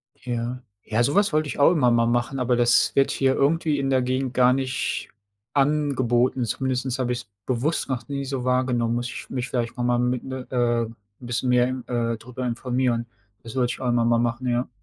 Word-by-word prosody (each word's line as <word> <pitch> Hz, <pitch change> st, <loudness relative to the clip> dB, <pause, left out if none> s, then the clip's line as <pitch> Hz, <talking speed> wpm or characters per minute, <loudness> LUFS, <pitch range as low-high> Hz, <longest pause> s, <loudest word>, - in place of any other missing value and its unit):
Ja. 120 Hz, 0 st, -4 dB, 0.2 s
Ja 110 Hz, +2 st, +1 dB
,so 140 Hz, +4 st, +1 dB
was 205 Hz, -2 st, +4 dB
wollte 155 Hz, -1 st, +2 dB
ich 145 Hz, -, -5 dB
auch 140 Hz, -, +6 dB
immer 130 Hz, -8 st, +3 dB
mal 115 Hz, 0 st, +3 dB
machen, 120 Hz, +3 st, 0 dB
aber 125 Hz, 0 st, +2 dB
das 120 Hz, -1 st, +3 dB
wird 135 Hz, -, +3 dB
hier 135 Hz, -1 st, +2 dB
irgendwie 150 Hz, +1 st, +2 dB
in 135 Hz, 0 st, -1 dB
der 130 Hz, -1 st, +3 dB
Gegend 130 Hz, 0 st, -1 dB
gar 125 Hz, 0 st, +5 dB
nicht 130 Hz, -1 st, -2 dB, 0.4 s
angeboten. 135 Hz, -4 st, +1 dB
Zumindest 130 Hz, +2 st, -1 dB
habe 125 Hz, -1 st, 0 dB
ich's 120 Hz, -4 st, -4 dB, 0.2 s
bewusst 130 Hz, +6 st, -1 dB
noch 120 Hz, -3 st, -3 dB
nie 140 Hz, -1 st, -3 dB
so 135 Hz, -2 st, -3 dB
wahrgenommen, 125 Hz, -2 st, +1 dB
muss 120 Hz, +1 st, -2 dB
ich -, -, -8 dB
mich 125 Hz, 0 st, -3 dB
vielleicht 120 Hz, -1 st, -2 dB
noch 120 Hz, -, -1 dB
mal 120 Hz, 0 st, +2 dB
mit, 125 Hz, 0 st, 0 dB
äh, 130 Hz, -1 st, -6 dB, 0.4 s
'n 115 Hz, +1 st, -11 dB, 0.2 s
bisschen 125 Hz, +1 st, -2 dB
mehr 125 Hz, 0 st, +4 dB
im 130 Hz, -1 st, -4 dB
äh, 115 Hz, -2 st, -1 dB
darüber 125 Hz, +2 st, -7 dB
informieren. 120 Hz, 0 st, -1 dB, 0.4 s
Das 115 Hz, +2 st, -9 dB
wollte 125 Hz, -2 st, +1 dB
ich -, -, -10 dB
auch 125 Hz, -, 0 dB
immer 120 Hz, -1 st, +2 dB
mal 115 Hz, 0 st, +3 dB
machen, 120 Hz, +2 st, -1 dB
ja. 120 Hz, +1 st, 0 dB
125 Hz, 210 wpm, -24 LUFS, 120-130 Hz, 0.4 s, auch